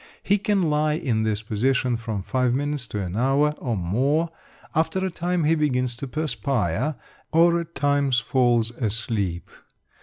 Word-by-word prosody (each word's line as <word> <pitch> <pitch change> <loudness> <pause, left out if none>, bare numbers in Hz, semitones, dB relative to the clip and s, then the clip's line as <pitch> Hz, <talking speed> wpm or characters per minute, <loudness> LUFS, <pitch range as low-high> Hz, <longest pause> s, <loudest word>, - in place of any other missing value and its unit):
He 205 +1 +2
can 200 -1 +1
lie 150 -1 +2
in 125 -8 0
this 110 0 -1
position 125 +3 +1
from 110 -4 -4
5 125 +3 +1
minutes 145 -2 -2
to 105 - -4
an 90 0 -5
hour 135 +5 +3
or 120 -6 -2
more. 135 - +1 0.4
After 160 +3 +1
a 190 - -2
time 175 0 -1
he 155 +2 +3
begins 130 -6 0
to 140 - -5
perspire, 125 - -1 0.4
or 170 +1 +4
at 170 0 -8
times 140 -2 +2
falls 120 -2 +2
asleep. 110 -6 -2
130 Hz, 155 wpm, -24 LUFS, 115-155 Hz, 0.4 s, or